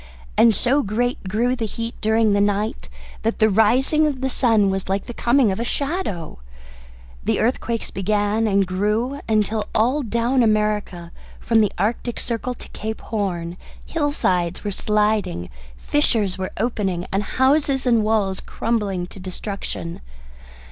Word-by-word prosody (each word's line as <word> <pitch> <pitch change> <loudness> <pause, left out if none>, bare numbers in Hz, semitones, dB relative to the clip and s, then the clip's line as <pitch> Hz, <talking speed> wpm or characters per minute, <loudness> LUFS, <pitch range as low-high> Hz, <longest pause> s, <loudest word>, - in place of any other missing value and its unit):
And 230 -2 +5
so 265 +7 +3
great 240 -1 -1
grew 240 +5 +1
the 230 -3 -2
heat 230 +2 -5
during 220 -1 +3
the 200 - +3
night 205 +2 -1 0.3
that 225 +1 -1
the 220 -1 +4
rising 255 +9 +3
of 280 -3 -2
the 265 0 0
sun 220 -7 +3
was 190 -1 -3
like 195 +1 -1
the 240 - -7
coming 240 -2 +3
of 190 - -3
a - - 0
shadow. 245 - -3 0.8
The - - +1
earthquakes 230 -1 -1
began 205 +3 +1
and 200 -1 +3
grew 210 +9 -1
until 215 0 +1
all 250 +7 +2
down 235 +2 +1
America 210 -6 0 0.3
from 225 -1 +3
the 210 - +2
Arctic 225 +5 -1
Circle 245 +1 -3
to - - -12
Cape 220 +1 -5
Horn, 180 -5 -3 0.3
hillsides 185 - 0
were 205 - -2
sliding, 210 - 0 0.3
fissures 225 -10 +1
were 185 0 -3
opening, 195 -6 -1
and 195 - +2
houses 270 +4 +2
and 235 -3 +3
walls 210 -3 +1
crumbling 205 -6 -2
to 190 - -12
destruction. 185 -2 -5
215 Hz, 150 wpm, -22 LUFS, 195-240 Hz, 0.8 s, And